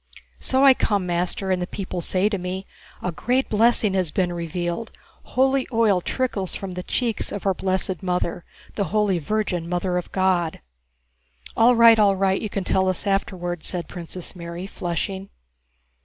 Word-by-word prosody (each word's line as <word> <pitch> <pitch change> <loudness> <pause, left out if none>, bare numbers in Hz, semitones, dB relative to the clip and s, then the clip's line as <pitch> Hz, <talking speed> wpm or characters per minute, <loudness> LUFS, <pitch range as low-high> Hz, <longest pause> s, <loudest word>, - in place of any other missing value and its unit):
"So 265 +1 +1
I 270 - +9
come, 205 -6 0
master, 180 +2 -1
and 185 -1 +1
the 180 - -2
people 185 -3 -5
say 185 +3 +1
to 205 -2 -1
me: 185 +2 -4 0.4
'A 180 - -1
great 250 +10 0
blessing 220 -1 +3
has 185 -4 +1
been 175 +2 0
revealed, 175 +5 -3 0.5
holy 265 0 +3
oil 220 -6 +3
trickles 205 -5 -2
from 195 -1 -5
the 180 0 -5
cheeks 230 +4 -2
of 205 - -5
our 195 - +3
blessed 190 -1 -1
Mother, 180 -2 -1 0.3
the 200 - -1
Holy 200 -1 +1
Virgin 175 -1 -2
Mother 180 0 0
of 180 - -9
God.'..." 185 -3 +1 1.0
"All 240 +2 +5
right, 230 -1 +7
all 200 -2 +5
right, 190 0 +1
you 215 - -3
can 200 -1 -3
tell 190 +1 +2
us 185 - -2
afterwards," 175 -4 -1
said 175 -3 -2
Princess 175 +1 -6
Mary, 170 +1 -6
flushing. 190 +1 -4
190 Hz, 170 wpm, -23 LUFS, 180-210 Hz, 1.0 s, I